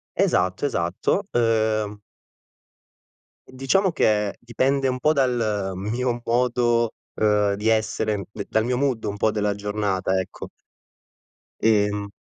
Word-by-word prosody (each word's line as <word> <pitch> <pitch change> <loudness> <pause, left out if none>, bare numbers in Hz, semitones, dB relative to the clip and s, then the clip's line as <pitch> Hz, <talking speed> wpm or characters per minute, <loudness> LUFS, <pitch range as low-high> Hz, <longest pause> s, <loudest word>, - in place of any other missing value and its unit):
Esatto, 90 +9 +1
esatto, 90 - 0
uhm. 110 -3 +1 1.5
Diciamo 135 +9 +1
che 105 -8 +1
dipende 130 +3 0
un 130 0 -1
po' 155 +4 +3
dal 115 -8 0
mio 120 +5 -2
modo, 120 -1 +1 0.2
uhm, 105 -2 +2
di 105 +2 -3
essere, 110 -2 0
d 100 -1 -6
dal 110 - +1
mio 125 +1 0
mood 130 -5 0
un 105 0 -3
po' 110 +1 +2
della 105 -1 -1
giornata, 100 -2 -1
ecco. 95 - -7 1.1
Ehm 105 -2 +2
110 Hz, 120 wpm, -23 LUFS, 105-125 Hz, 1.5 s, po